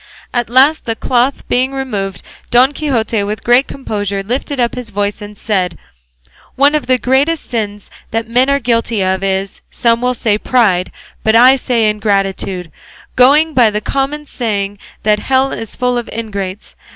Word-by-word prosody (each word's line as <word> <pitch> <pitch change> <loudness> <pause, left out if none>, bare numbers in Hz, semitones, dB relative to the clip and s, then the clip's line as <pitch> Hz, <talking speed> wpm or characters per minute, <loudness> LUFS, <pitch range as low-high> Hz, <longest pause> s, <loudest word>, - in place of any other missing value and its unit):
At 240 -2 -1
last 270 +6 +4
the 225 - -2
cloth 250 +4 0
being 255 +2 0
removed, 205 -8 -4 0.3
Don 255 +3 +4
Quixote 235 -8 -1
with 210 +2 -4
great 245 +3 +4
composure 205 -6 -3
lifted 255 +5 -3
up 240 -1 +1
his 250 -2 -6
voice 205 0 -2
and 205 0 -9
said: 185 -6 -1 0.8
"One 285 +2 +4
of 300 -4 -1
the 255 0 +3
greatest 275 +6 0
sins 205 -3 -4 0.2
that 225 0 -2
men 250 +4 +2
are 280 - +3
guilty 230 -4 0
of 190 +1 0
is 195 0 -2
some 235 -1 +1
will 250 0 0
say 215 -3 0
pride 205 -9 +1 0.3
but 220 0 +2
I 250 +3 +7
say 240 -4 +1
ingratitude, 195 -4 -1 0.4
going 295 +5 +5
by 245 -5 +5
the 210 0 -2
common 275 +6 -2
saying 205 -6 -3 0.2
that 210 0 +2
hell 265 +4 +1
is 225 -2 -5
full 250 -1 0
of 240 - -7
ingrates. 200 -3 -5
230 Hz, 165 wpm, -15 LUFS, 205-260 Hz, 0.8 s, I